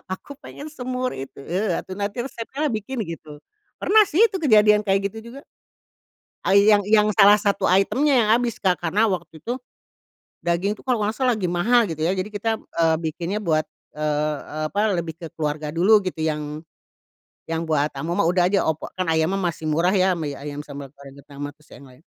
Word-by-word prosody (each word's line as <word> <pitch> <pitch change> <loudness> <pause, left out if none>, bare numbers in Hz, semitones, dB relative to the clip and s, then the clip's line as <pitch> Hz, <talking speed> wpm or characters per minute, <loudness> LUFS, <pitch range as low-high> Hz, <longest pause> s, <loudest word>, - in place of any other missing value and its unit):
"Aku 235 - -16
pengen 290 0 -10
semur 255 -2 -3
itu." 135 +1 -8
"Eee, 190 +8 -1
atuh - - -6
nanti 205 +4 -2
resepnyalah 270 +4 -4
bikin." 225 +2 -3
Gitu. 155 -4 -9 0.3
Pernah 435 +1 +5
sih 365 +9 +3
itu 390 -4 -2
kejadian 210 -7 +5
kayak 195 0 +1
gitu 225 - -9
juga. 275 +3 -10 1.1
Ai 200 +1 +6
yang 205 - +6
yang 210 0 +4
salah 205 +1 +9
satu 205 -1 0
item-nya 265 +10 +3
yang 210 - -1
habis 240 -2 -2
Kak 185 -2 +2
karena 175 +6 +1
waktu 160 -4 -6
itu 245 +6 -3 0.9
daging 180 +5 0
itu - - -17
kalau 250 -4 0
enggak 210 +1 -1
salah 255 -2 +2
lagi 200 -6 -2
mahal, 220 +6 +3
gitu 160 -1 -3
ya. 175 - +2
Jadi 185 +1 -2
kita, 215 +1 -2
eee, 165 -1 +1
bikinnya 170 +5 -3
buat, 155 -6 +1 0.3
eee 150 0 0
eee, 155 +1 -5
apa, 205 +4 +1
lebih 170 -3 -3
ke 165 -2 -9
keluarga 150 -1 -3
dulu 200 +5 +4
gitu, 185 -3 -4
yang 150 -1 -2 0.9
yang 165 0 -2
buat 150 -1 +1
tamu 160 +6 -3
mah 200 - +2
udah 180 +1 +3
aja 195 - +1
opor. 160 -1 -2
Kan 185 - 0
ayamnya 160 +5 +1
masih 170 -4 -2
murah 170 +5 +2
ya, 185 -2 +2
mi, 150 -3 -3
ayam 145 +1 -7
sambal 140 -1 -8
goreng 140 0 -14
kentang 140 0 -16
mah 145 - -7
terus 150 0 -27
yang 140 - -13
lain. 130 +1 -18
185 Hz, 200 wpm, -23 LUFS, 155-215 Hz, 1.1 s, salah